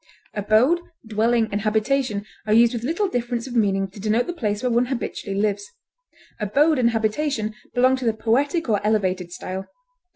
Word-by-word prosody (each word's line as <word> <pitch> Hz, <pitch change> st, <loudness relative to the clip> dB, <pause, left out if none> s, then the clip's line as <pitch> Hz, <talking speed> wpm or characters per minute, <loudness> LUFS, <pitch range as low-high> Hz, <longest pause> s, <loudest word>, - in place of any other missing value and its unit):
Abode, 215 Hz, -, +3 dB, 0.3 s
dwelling, 225 Hz, +1 st, +1 dB
and 205 Hz, +1 st, -1 dB
habitation 215 Hz, 0 st, 0 dB, 0.2 s
are 210 Hz, -, +3 dB
used 235 Hz, +1 st, +5 dB
with 235 Hz, -, -3 dB
little 330 Hz, -, 0 dB
difference 240 Hz, -6 st, -2 dB
of 250 Hz, -2 st, -7 dB
meaning 195 Hz, -3 st, +2 dB
to 200 Hz, -, -12 dB
denote 220 Hz, +4 st, +1 dB
the 350 Hz, -, -4 dB
place 210 Hz, -9 st, -2 dB
where 250 Hz, -, +1 dB
one 240 Hz, +1 st, +2 dB
habitually 225 Hz, -6 st, -3 dB
lives; 210 Hz, -, 0 dB, 0.7 s
abode 280 Hz, +8 st, +2 dB
and 235 Hz, -2 st, +4 dB
habitation 225 Hz, 0 st, -1 dB, 0.2 s
belong 255 Hz, +1 st, +4 dB
to 260 Hz, -, -5 dB
the 225 Hz, -, +2 dB
poetic 275 Hz, +10 st, +1 dB
or 210 Hz, -3 st, +1 dB
elevated 190 Hz, -4 st, 0 dB
style. 190 Hz, +2 st, -6 dB
225 Hz, 170 wpm, -23 LUFS, 210-255 Hz, 0.7 s, used